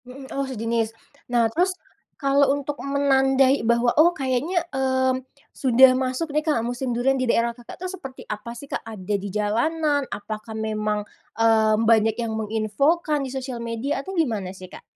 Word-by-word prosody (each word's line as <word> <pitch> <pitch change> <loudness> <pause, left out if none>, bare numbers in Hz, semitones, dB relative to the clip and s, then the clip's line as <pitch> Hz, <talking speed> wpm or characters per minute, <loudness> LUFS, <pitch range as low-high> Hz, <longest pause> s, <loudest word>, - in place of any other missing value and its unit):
Mhm. 265 +2 -10
Oh, 275 0 -1
sejenis. 230 -2 -1 0.4
Nah, 240 -1 +3
terus 365 +3 +2 0.5
kalau 275 0 +4
untuk 285 0 -4
menandai 270 -1 +3
bahwa, 235 +1 +3
oh, 335 +3 +6
kayaknya, 280 +5 0
mmm, 260 -1 +1 0.3
sudah 260 0 +6
masuk 260 +5 -2
deh, 305 - +2
Kak, 300 -8 +1
musim 245 +1 -2
durian 260 +3 +1
di 255 - 0
daerah 235 0 +3
Kakak 240 +7 -13
tuh, 370 - -3
seperti 270 -9 -9
apa 225 +3 -5
sih, 280 - -9
Kak, - - -3
ada 210 -2 -4
di 200 +1 -6
jalanan, 285 +8 +1
apakah 215 +2 -6
memang, 215 -1 -1 0.4
eee, 220 -1 +4
banyak 225 -1 +4
yang 230 -1 -2
menginfokan 275 +9 0
di - - -5
sosial 260 -2 -4
media 235 +5 -2
atau 385 - -6
gimana 215 - -1
sih, 185 -1 -11
Kak? - - -11
255 Hz, 170 wpm, -23 LUFS, 225-275 Hz, 0.5 s, oh